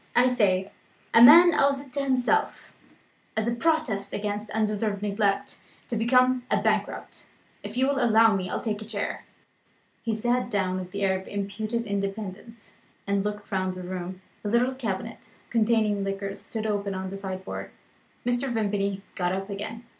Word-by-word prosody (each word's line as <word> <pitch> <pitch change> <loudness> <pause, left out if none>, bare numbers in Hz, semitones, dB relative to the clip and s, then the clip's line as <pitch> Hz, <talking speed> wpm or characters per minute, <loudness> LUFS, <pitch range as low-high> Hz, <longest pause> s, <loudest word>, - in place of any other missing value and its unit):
I 250 +1 +6
say, 200 -6 +1 0.4
a 230 - +7
man 335 +8 +10
owes 280 -2 +3
it 275 -2 -13
to 280 - -1
himself 265 - 0 0.6
(as 220 +1 +1
a 235 - +1
protest 245 -7 0
against 205 +1 -3
undeserved 210 -1 -1
neglect) 200 -1 0 0.3
to 235 - -2
become 250 +2 +3
a - - +2
bankrupt. - - -2 0.3
If - - -7
you 260 - +3
will 275 -2 +1
allow 225 -2 +5
me, 185 -1 -2
I'll - - -2
take 215 -2 -2
a - - -7
chair." 210 -2 -4 0.8
He 225 -2 -1
sat 240 +3 0
down 185 -4 0
with 185 0 -7
an 200 - -2
air 190 -1 +2
of 190 - -13
impudent 215 +3 -3
independence 200 +2 -5 0.3
and 200 0 0
looked 210 0 -5
round 185 -1 -1
the 185 - -7
room. 185 +1 -6 0.2
A - - -3
little 240 +4 +2
cabinet, 225 -3 -5 0.2
containing 215 -3 +2
liqueurs, 195 0 -4
stood 220 -1 -5
open 200 -2 -1
on 190 0 -4
the 195 - -5
sideboard. 190 -1 -5 0.6
Mr. 245 +2 0
Vimpany 200 -3 -1
got 180 0 -1
up 195 +2 -4
again. 220 +4 -6
210 Hz, 170 wpm, -26 LUFS, 195-235 Hz, 0.8 s, man